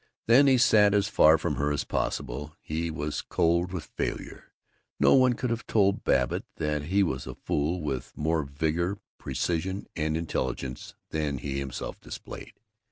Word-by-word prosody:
Then 130 +5 +6
he 130 -1 +5
sat 105 -4 +5
as 100 0 +2
far 80 -5 +6
from 80 - -2
her 75 +1 0
as 75 - -1
possible. 70 +3 -3
He 80 +2 -3
was 75 -1 -3
cold 85 +2 +1
with 90 -4 -4
failure. - - -5 0.5
No - - +6
one 130 -2 +5
could 120 0 -2
have 115 - -3
told 100 -3 +2
Babbitt - - +1
that 75 -1 -2
he 100 +5 +3
was 65 -8 -2
a - - -6
fool 80 +4 -1
with 70 -4 -3
more 80 +1 +1
vigor, 80 +7 -1 0.2
precision, 85 +9 -2
and 80 0 0
intelligence 65 -5 -4 0.2
than 75 -3 -1
he 70 +1 -3
himself 70 -3 -5
displayed. - - -9
80 Hz, 165 wpm, -27 LUFS, 75-95 Hz, 0.5 s, Then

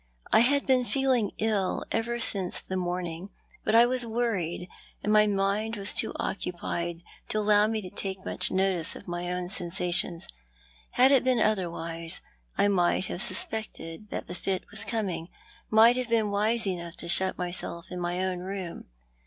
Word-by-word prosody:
I - - +6
had 280 +5 +3
been 260 -2 +3
feeling 255 -4 +1
ill 210 -4 -1
ever 235 +1 -1
since 195 -6 0
the 190 - -6
morning; 180 0 -3 0.3
but 215 - +1
I 235 +1 +8
was 250 0 +3
worried, 220 -7 -2 0.4
and 210 - +1
my 215 0 +5
mind 205 +3 0
waa 200 - -7
too - - +3
occupied 175 -2 -4 0.3
to - - -1
allow 210 0 +4
me 220 -1 -2
to 185 - -7
take 190 -1 -5
much - - +3
notice 190 -4 +1
of - - -12
my 175 0 -4
own 180 0 -3
seur 180 -2 -2
sations. 175 -1 +1 0.7
Had 260 +2 +5
it 270 -3 +5
been 255 -1 +2
otherwise, 170 -5 -1 0.4
I - - +3
might 185 -1 +2
have 180 - -5
suspected 210 -4 -2
that - - -5
the - - -7
fit 190 +1 -2
was 215 - +4
coming, 195 -7 -3 0.4
might 225 +3 +6
have 250 -2 -3
been 220 -3 +1
wise 215 +3 +2
enough 170 -3 -4
to - - -3
shut 190 +2 +4
myself 175 -1 -1
in 180 - -5
my 175 +1 -2
own 185 -1 -2
room. 185 -1 -6
195 Hz, 175 wpm, -27 LUFS, 175-220 Hz, 0.7 s, I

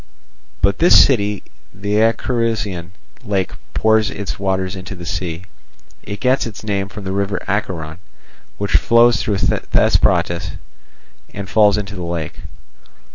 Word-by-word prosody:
By 100 - +5
this 170 - +6
city 105 -6 0 0.3
the 100 +2 -2
Acherusian 115 -6 0 0.3
lake 95 -3 -1 0.2
pours 110 -1 +3
its 100 0 -5
waters 95 0 -1
into 95 +1 -7
the 85 -1 -9
sea. 90 -1 -4 0.6
It 100 0 -7
gets 130 +1 +2
its 110 -2 -9
name 100 -2 -2
from 105 0 -9
the 95 - -4
river 100 +1 -1
Acheron, 90 -5 -3 0.6
which 100 -1 -3
flows 120 0 +4
through 105 -2 -1
Thesprotis 85 -4 +1 0.8
and 100 -1 -5
falls 105 +1 +4
into 100 -1 -4
the 95 - -6
lake. 85 -3 -4
100 Hz, 130 wpm, -18 LUFS, 95-110 Hz, 0.8 s, this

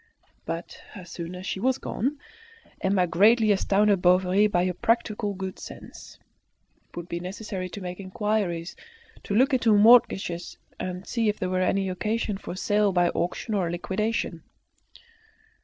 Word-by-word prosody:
But 165 +1 -6
as 185 -3 -10
soon 170 +1 -6
as 180 +1 -8
she 190 - -3
was 260 +4 +1
gone, 275 +6 -3 0.6
Emma 190 -1 +2
greatly 215 +5 +4
astounded 200 0 +2
Bovary 185 +3 +4
by 180 -3 +1
her 185 - -1
practical 215 0 0
good 190 0 -6
sense. - - -11 0.7
It - - -16
would 170 0 -6
be 170 - -4
necessary 185 0 -5
to 200 - -8
make 180 0 -6
inquiries, 190 -3 -2 0.5
to 200 - -3
look 265 +5 +4
into 230 -4 +4
mortgages, 205 -6 +4 0.2
and 180 +1 -5
see 230 -3 0
if 210 - -1
there 185 0 -3
were 185 0 +1
any 195 +1 +1
occasion 210 +2 -2
for - - -7
a - - -9
sale 205 +1 +2
by 175 -1 +3
auction 180 +6 -3
or 190 -4 +1
a - - -3
liquidation. 195 +6 -2
195 Hz, 160 wpm, -26 LUFS, 180-210 Hz, 0.7 s, greatly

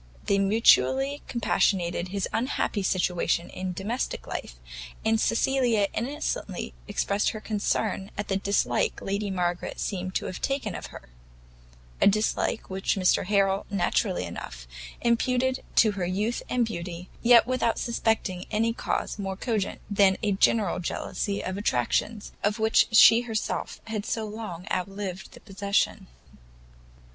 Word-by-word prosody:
They 200 - +2
mutually 260 +7 +4
compassionated 185 -6 +1
his 195 +1 -2
unhappy 225 -3 -1
situation 180 -2 0
in 185 0 -4
domestic 195 - -3
life, - - -6 0.5
and 220 0 +3
Cecilia 230 -4 +2
innocently 235 - -3
expressed 200 +1 0
her 215 - -5
concern 210 -2 -1
at 205 - -3
the 195 - 0
dislike 195 -11 0
Lady 200 +1 -2
Margaret 175 -2 -2
seemed 185 -2 -3
to - - 0
have 185 - -6
taken 270 -8 -1
to - - -7
her; - - -12 0.9
a - - +6
dislike 215 +2 +1
which 190 0 -1
Mr 185 -1 +2
Harrel 195 -1 +2
naturally 195 - 0
enough 60 -8 -8 0.3
imputed 255 +2 +1
to 220 - +5
her 195 -3 -3
youth 210 +6 -1
and 245 -1 +2
beauty, 175 -3 -6
yet 235 -1 +7
without 255 -2 0
suspecting 220 -6 -1
any 225 +2 +1
cause 220 - -3
more 195 -1 -3
cogent 215 -3 -2
than 200 -2 +4
a 210 - +2
general 200 0 +2
jealousy 200 +3 -3
of 185 +2 -3
attractions 205 - 0
of 205 +2 +1
which 220 0 +4
she 225 +1 +8
had 245 - -10
herself 225 -1 -3 0.2
so 220 +1 -2
long 210 -5 -7
outlived 190 0 -4
the - - -12
possession. 200 0 -1
200 Hz, 135 wpm, -27 LUFS, 185-225 Hz, 0.9 s, she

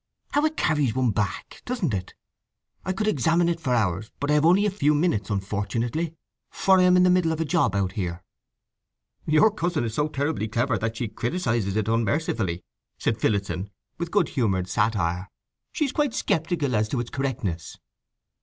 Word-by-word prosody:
How 290 - +2
it 315 0 -1
carries 145 -7 +1
one 130 -3 +2
back, 100 -4 -3
doesn't 235 - -2
it! 90 -2 -4 0.7
I 185 - -2
could 210 +3 -1
examine 165 - +2
it 170 -1 0
for 130 -6 0
hours, 105 -2 0
but 145 +1 0
I - - +4
have 150 +2 +4
only 190 +4 +5
a 205 - +1
few 150 -6 +2
minutes, 145 - 0
unfortunately; 110 - -2 0.3
for 190 -1 +3
I - - +5
am 180 0 +5
in 180 - +5
the 180 - +5
middle 180 -3 +3
of 160 - -2
a 165 - 0
job 145 - +1
out 95 -2 0
here." 90 -3 -4 1.0
"Your 155 +8 +5
cousin 175 - -1
is 115 -2 -3
so 150 +5 +1
terribly 145 -5 -2
clever 115 +2 0
that 115 0 -2
she 120 - -2
criticizes 115 - -1
it 110 -1 0
unmercifully," 110 - 0 0.3
said - - -1
Phillotson, 100 -2 0 0.3
with 170 0 -3
good 190 -4 +2
humoured 95 -8 0
satire. 95 -2 0 0.4
"She 305 - 0
is 275 - -2
quite 290 -4 0
sceptical 160 -4 0
as 110 0 +1
to 130 - -1
its 120 0 -4
correctness." 110 - -3
130 Hz, 185 wpm, -25 LUFS, 105-170 Hz, 1.0 s, only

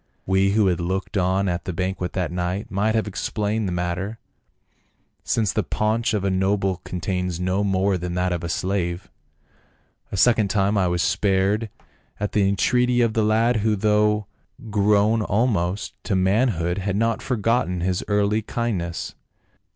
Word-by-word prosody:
We 95 +1 +2
who 105 -1 +3
had 90 -3 +1
looked 95 +5 -3
on 95 +1 +1
at 85 -1 -2
the 95 - -3
banquet 90 +1 -3
that 90 -3 -2
night 90 +3 -3
might 105 +3 +1
have 110 - +1
explained 105 +1 -2
the - - -2
matter, 90 +5 -3 1.1
since 110 -4 0
the 110 - +1
paunch 110 +2 0
of 100 - -1
a 100 - +1
noble 95 0 +1
contains 90 -1 -3
no 90 +2 0
more 95 -1 +1
than 90 0 -4
that 90 0 0
of 85 -1 -2
a 85 - -3
slave. 90 0 -2 1.0
A - - -3
second 115 0 +4
time 100 +1 +1
I 95 -3 +2
was 85 -1 0
spared 100 +4 +1 0.5
at 105 0 -2
the 100 -2 +2
entreaty 125 +5 +2
of 115 -2 +2
the 110 - +1
lad, 115 +3 +2
who 110 0 +1
though 105 0 +2 0.5
grown 105 +2 +3
almost 105 -3 0
to 100 - 0
manhood 95 -2 +1
had 100 0 -2
not 115 +2 0
forgotten 115 -6 0
his 90 0 -1
early 105 +1 +1
kindness. 100 -7 -3
100 Hz, 160 wpm, -23 LUFS, 90-105 Hz, 1.1 s, second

